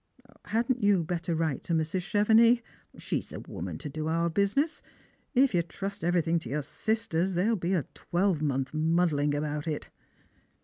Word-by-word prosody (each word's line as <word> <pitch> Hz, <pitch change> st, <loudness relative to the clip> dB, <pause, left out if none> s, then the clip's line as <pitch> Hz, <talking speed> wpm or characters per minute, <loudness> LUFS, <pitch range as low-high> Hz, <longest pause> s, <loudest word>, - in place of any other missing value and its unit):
Hadn't 235 Hz, +3 st, 0 dB
you 200 Hz, -4 st, +4 dB
better 170 Hz, 0 st, -2 dB
write 160 Hz, -4 st, -1 dB
to 170 Hz, -, -1 dB
Mrs. 160 Hz, +3 st, 0 dB
Chevenix? 225 Hz, +4 st, +4 dB, 0.3 s
She's -, -, -3 dB
the -, -, -7 dB
woman -, -, -6 dB
to 155 Hz, -, -7 dB
do 155 Hz, +2 st, -4 dB
our 165 Hz, +1 st, +1 dB
business. 205 Hz, -, +1 dB, 0.5 s
If 265 Hz, -1 st, +4 dB
you 175 Hz, -, +3 dB
trust 195 Hz, +4 st, -6 dB
everything 170 Hz, -1 st, +2 dB
to 125 Hz, -, -9 dB
your 145 Hz, +2 st, -1 dB
sisters, 190 Hz, 0 st, -1 dB
they'll 210 Hz, +6 st, +2 dB
be 185 Hz, 0 st, 0 dB
a 165 Hz, -, +1 dB
twelvemonth 155 Hz, -7 st, 0 dB
muddling 155 Hz, -2 st, +2 dB
about 150 Hz, +1 st, -2 dB
it." 150 Hz, -2 st, -4 dB
170 Hz, 160 wpm, -29 LUFS, 155-205 Hz, 0.5 s, you